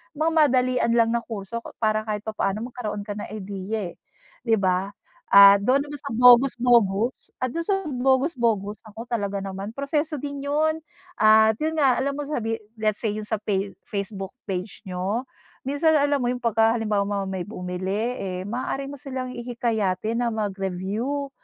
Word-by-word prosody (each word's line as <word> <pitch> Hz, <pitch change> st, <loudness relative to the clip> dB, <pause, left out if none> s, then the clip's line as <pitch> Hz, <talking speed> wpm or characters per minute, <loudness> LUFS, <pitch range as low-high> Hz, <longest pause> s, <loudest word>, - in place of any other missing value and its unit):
mga 315 Hz, +2 st, +1 dB
madalian 255 Hz, -5 st, +3 dB
lang 230 Hz, -1 st, +4 dB
na 235 Hz, -, +1 dB
kurso 220 Hz, +1 st, -5 dB, 0.2 s
para 215 Hz, 0 st, +2 dB
kahit 210 Hz, -1 st, -1 dB
papaano 215 Hz, +1 st, -2 dB
magkaroon 210 Hz, -4 st, -4 dB
ka 205 Hz, -, -5 dB
ng -, -, -6 dB
ideya 200 Hz, -1 st, -4 dB
eh. -, -, -27 dB, 0.5 s
Di 225 Hz, -, +4 dB
ba? 185 Hz, +1 st, 0 dB, 0.4 s
Ah 200 Hz, 0 st, +10 dB
dun 255 Hz, +7 st, +3 dB
naman 290 Hz, 0 st, -8 dB
sa 280 Hz, -, -6 dB
bogus 250 Hz, +2 st, +7 dB
bogus 235 Hz, -1 st, +2 dB
at 255 Hz, -, 0 dB
dun 335 Hz, -, -1 dB
sa 390 Hz, -2 st, 0 dB
bogus 265 Hz, +3 st, +2 dB
bogus 210 Hz, -3 st, 0 dB
naku 220 Hz, +2 st, -9 dB
talaga 200 Hz, -4 st, -1 dB
naman, 195 Hz, +2 st, -5 dB
proseso 295 Hz, +2 st, -1 dB
din 280 Hz, 0 st, -5 dB
yun 315 Hz, +2 st, +1 dB, 0.4 s
at 220 Hz, 0 st, +6 dB
yun 320 Hz, +1 st, -1 dB
nga 265 Hz, -4 st, +4 dB
alam 280 Hz, +1 st, -1 dB
mo 290 Hz, -, -3 dB
sabi 225 Hz, -6 st, -2 dB, 0.2 s
let's 215 Hz, -1 st, 0 dB
say 220 Hz, -3 st, 0 dB
yun 215 Hz, -, -4 dB
sa 220 Hz, 0 st, -1 dB
face 195 Hz, -1 st, -1 dB
Facebook 200 Hz, -1 st, -5 dB, 0.2 s
page 185 Hz, +2 st, -4 dB
niyo, 190 Hz, +7 st, -2 dB, 0.4 s
minsan 300 Hz, +4 st, +2 dB
alam 285 Hz, 0 st, +2 dB
mo 245 Hz, -, 0 dB
yung 250 Hz, -, -6 dB
pagka 225 Hz, -1 st, +3 dB
halimbawa 210 Hz, -3 st, 0 dB
mo 200 Hz, -1 st, -2 dB
may 185 Hz, -2 st, -3 dB
bumili 195 Hz, +4 st, -3 dB
eh 185 Hz, -1 st, -4 dB
maaari 260 Hz, +4 st, -3 dB
mo 285 Hz, -, -8 dB
silang 260 Hz, -1 st, -5 dB
ihikayatin 230 Hz, -3 st, -1 dB
na 235 Hz, -, 0 dB
mag-review, 210 Hz, +7 st, -2 dB
225 Hz, 175 wpm, -24 LUFS, 200-260 Hz, 0.5 s, Ah